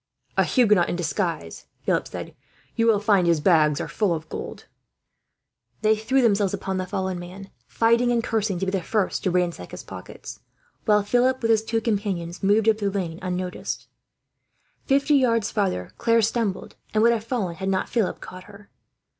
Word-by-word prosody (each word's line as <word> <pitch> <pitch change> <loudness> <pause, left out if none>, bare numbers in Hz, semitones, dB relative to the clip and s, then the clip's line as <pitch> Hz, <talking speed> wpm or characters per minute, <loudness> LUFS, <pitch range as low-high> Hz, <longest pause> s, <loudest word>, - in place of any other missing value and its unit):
"A - - +4
Huguenot 210 -8 +3
in - - -1
disguise," 165 - -3 0.2
Philip - - +1
said. - - -8 0.4
"You 230 0 +2
will 220 -3 +4
find 200 -4 +3
his 170 -2 +3
pockets 150 -3 +3
are - - -3
full 200 -6 0
of 160 0 -7
gold." - - -7 1.2
They 215 0 +4
threw 245 +5 +1
themselves 200 -4 +2
upon 190 -1 -3
the 185 0 -3
fallen 190 -1 -2
man, 185 +3 -10 0.2
fighting 235 +2 +2
and 235 -1 +1
cursing 215 -5 -1
to 190 - -2
be 190 - -1
the 190 -2 -1
first 200 +3 -1
to - - +1
ransack 180 -1 -1
his - - -9
pockets; - - -10 0.5
while 210 -2 +4
Philip, 245 +4 +1
with 230 - +3
his 220 -1 +3
two 225 0 -1
companions, 195 -6 -2
moved 205 +3 +3
up 220 -1 +4
the 200 -2 0
lane 180 -4 -3
unnoticed. 180 0 -4 1.0
Fifty 280 +1 +3
yards 230 -5 +2
farther 190 - -1
Claire 230 -1 +3
stumbled, 220 -3 -1 0.2
and 215 - +4
would 235 0 +5
have 220 -2 -2
fallen 215 -8 -3
had 190 0 -2
not 190 -1 0
Philip 225 -6 -1
caught 185 0 -10
her. 205 0 -15
200 Hz, 180 wpm, -24 LUFS, 180-225 Hz, 1.2 s, would